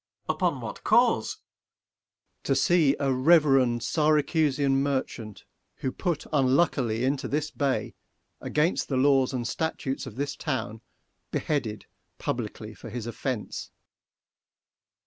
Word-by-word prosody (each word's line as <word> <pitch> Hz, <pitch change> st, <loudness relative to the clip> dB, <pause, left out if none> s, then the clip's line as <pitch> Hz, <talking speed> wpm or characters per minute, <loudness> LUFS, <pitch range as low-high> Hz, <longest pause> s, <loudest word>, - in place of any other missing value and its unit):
Ang. -, -, +1 dB
Upon -, -, 0 dB
what -, -, -7 dB
cause? -, -, +3 dB
Sec. -, -, -17 dB
Mer. -, -, -35 dB, 1.0 s
To 135 Hz, -, +2 dB
see 155 Hz, -1 st, +4 dB
a 135 Hz, -2 st, +1 dB
reverend 135 Hz, -4 st, +4 dB
Syracusian 150 Hz, -1 st, +2 dB
merchant, 130 Hz, -6 st, -3 dB, 0.3 s
Who 130 Hz, -, -3 dB
put 170 Hz, +1 st, -2 dB
unluckily 130 Hz, -4 st, +2 dB
into 135 Hz, +1 st, 0 dB
this 150 Hz, +1 st, -1 dB
bay 140 Hz, -2 st, -1 dB, 0.5 s
125 -, -, -7 dB
Against 155 Hz, +4 st, +1 dB
the 135 Hz, -, -1 dB
laws 135 Hz, -1 st, +4 dB
and 125 Hz, -3 st, -2 dB
statutes 140 Hz, -2 st, -3 dB
of -, -, -9 dB
this 140 Hz, +2 st, -3 dB
town, 115 Hz, -7 st, -3 dB, 0.5 s
Beheaded 115 Hz, -9 st, -2 dB, 0.3 s
publicly 110 Hz, -2 st, -4 dB
for 115 Hz, -, -10 dB
his 115 Hz, 0 st, -5 dB
offence. 120 Hz, -1 st, -4 dB
135 Hz, 125 wpm, -27 LUFS, 120-150 Hz, 1.0 s, see